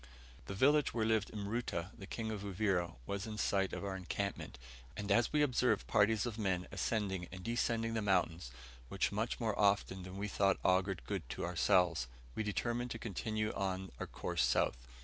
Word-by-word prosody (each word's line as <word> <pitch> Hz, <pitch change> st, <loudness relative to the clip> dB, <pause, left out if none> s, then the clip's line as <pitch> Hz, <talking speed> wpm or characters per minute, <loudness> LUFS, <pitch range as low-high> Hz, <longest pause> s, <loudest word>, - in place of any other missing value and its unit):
The 100 Hz, -, -4 dB
village 145 Hz, +7 st, +4 dB
where 110 Hz, -2 st, +2 dB
lived 110 Hz, -2 st, +2 dB
Mruta, 100 Hz, -4 st, -3 dB
the 95 Hz, -, -9 dB
King 110 Hz, 0 st, -3 dB
of 105 Hz, -2 st, -4 dB
Uvira, 95 Hz, -, 0 dB
was 100 Hz, -, -3 dB
in 105 Hz, -1 st, -5 dB
sight 95 Hz, -2 st, +1 dB
of -, -, -4 dB
our 95 Hz, -1 st, -2 dB
encampment, 95 Hz, +1 st, -3 dB, 0.4 s
and 105 Hz, 0 st, -3 dB
as 120 Hz, +3 st, +4 dB
we 150 Hz, -1 st, +4 dB
observed 125 Hz, -5 st, +2 dB
parties 105 Hz, 0 st, +3 dB
of 115 Hz, -2 st, -4 dB
men 95 Hz, -4 st, 0 dB
ascending 95 Hz, -5 st, -1 dB
and 95 Hz, 0 st, -8 dB
descending 115 Hz, 0 st, 0 dB
the 110 Hz, -, 0 dB
mountains 90 Hz, -8 st, +1 dB, 0.6 s
much 110 Hz, +4 st, -1 dB
more 110 Hz, -4 st, -1 dB
often 100 Hz, -2 st, +3 dB
than 95 Hz, +1 st, -8 dB
we 100 Hz, +1 st, -2 dB
thought 100 Hz, -1 st, +2 dB
augured 95 Hz, 0 st, +2 dB
good -, -, -4 dB
to -, -, -3 dB
ourselves, 85 Hz, -4 st, +3 dB, 0.3 s
we -, -, -2 dB
determined 120 Hz, +3 st, -1 dB
to 115 Hz, -, -4 dB
continue 110 Hz, 0 st, -2 dB
on 95 Hz, -1 st, -2 dB
our -, -, -3 dB
course -, -, -1 dB
south. -, -, +1 dB
100 Hz, 180 wpm, -35 LUFS, 95-110 Hz, 0.6 s, village